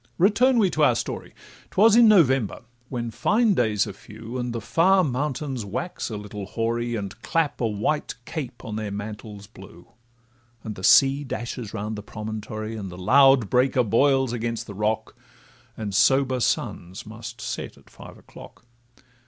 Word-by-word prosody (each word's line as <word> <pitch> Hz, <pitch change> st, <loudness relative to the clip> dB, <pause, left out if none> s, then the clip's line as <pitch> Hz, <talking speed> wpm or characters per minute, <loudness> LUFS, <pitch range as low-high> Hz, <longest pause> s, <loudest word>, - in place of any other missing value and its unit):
—Return 235 Hz, +8 st, +4 dB
we 200 Hz, -5 st, +3 dB
to 155 Hz, -, +1 dB
our 125 Hz, -5 st, +5 dB
story: -, -, -5 dB, 0.4 s
'Twas 215 Hz, +2 st, +5 dB
in 235 Hz, -1 st, +7 dB
November, 135 Hz, -, +3 dB, 0.3 s
when 120 Hz, -2 st, -4 dB
fine 220 Hz, -, +2 dB
days 110 Hz, -, +1 dB
are 100 Hz, -, -7 dB
few, 110 Hz, +5 st, -9 dB
And 125 Hz, 0 st, -3 dB
the 115 Hz, -, -3 dB
far 185 Hz, -, +3 dB
mountains 135 Hz, -2 st, -2 dB
wax 115 Hz, -, -4 dB
a 110 Hz, -, -4 dB
little 105 Hz, -1 st, -7 dB
hoary, 115 Hz, +2 st, -2 dB
And 100 Hz, +1 st, -6 dB
clap 150 Hz, +6 st, -1 dB
a 115 Hz, -, +2 dB
white 110 Hz, +8 st, -2 dB
cape 135 Hz, -7 st, -6 dB
on 110 Hz, -1 st, -5 dB
their 110 Hz, -1 st, -3 dB
mantles 105 Hz, 0 st, -7 dB
blue; 95 Hz, -4 st, -15 dB, 0.7 s
And 110 Hz, -, -5 dB
the 95 Hz, -, -11 dB
sea 135 Hz, +5 st, +5 dB
dashes 120 Hz, -4 st, -5 dB
round 110 Hz, +1 st, -4 dB
the -, -, -5 dB
promontory, 110 Hz, +1 st, -6 dB
And 100 Hz, -3 st, -6 dB
the 90 Hz, -, -10 dB
loud 135 Hz, +4 st, +5 dB
breaker 125 Hz, +3 st, +2 dB
boils 130 Hz, +3 st, +2 dB
against 115 Hz, -1 st, -3 dB
the 100 Hz, -, -9 dB
rock, 105 Hz, +3 st, -2 dB, 0.6 s
And 105 Hz, -3 st, -4 dB
sober 130 Hz, +5 st, +3 dB
suns 90 Hz, -5 st, -2 dB
must 115 Hz, +2 st, -9 dB
set -, -, -5 dB
at -, -, -21 dB
five -, -, -13 dB
o'clock. -, -, -15 dB
115 Hz, 165 wpm, -24 LUFS, 105-135 Hz, 0.7 s, in